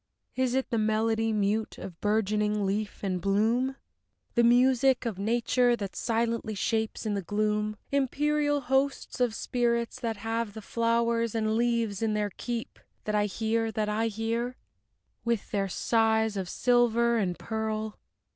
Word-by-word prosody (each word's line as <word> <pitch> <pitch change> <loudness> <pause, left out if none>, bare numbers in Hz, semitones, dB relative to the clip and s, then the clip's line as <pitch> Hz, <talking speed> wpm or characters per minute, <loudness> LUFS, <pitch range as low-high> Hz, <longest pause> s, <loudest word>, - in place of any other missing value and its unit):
Is 255 -1 +1
it 265 - -1
the 230 - +1
melody 220 +1 +1
mute 215 +1 0
of 175 -3 -9
bourgeoning 210 0 +1
leaf 205 +2 -2
and 190 -2 0
of - - -7
bloom? 225 +7 +1 0.6
The 235 - +3
music 255 +2 +4
of 215 -5 -3
Nature, 240 +3 +2
that 200 -4 -6
silently 230 -1 -1
shapes 220 +3 -1
in 215 - 0
the 200 - -1
gloom 210 +2 -1
Immaterial 290 +2 +1
hosts 270 0 0
Of 245 -3 +1
spirits 235 -1 -1
that 225 -2 -2
have 225 0 -3
the 220 - -6
flowers 230 0 +1
and 220 -1 +1
leaves 230 -3 0
in 220 -1 +1
their 210 -1 -1
keep, 235 +4 -5 0.2
That 215 - -2
I 210 0 +2
hear, 225 +2 -1
that 210 0 -1
I 220 +2 +1
hear? 230 +3 -2 0.7
With 235 -3 -1
their 195 -1 0
sighs 220 +1 +2
of 190 -3 -3
silver 235 0 +3
and 180 -4 -1
pearl? 220 -1 -3
225 Hz, 155 wpm, -28 LUFS, 210-235 Hz, 0.7 s, music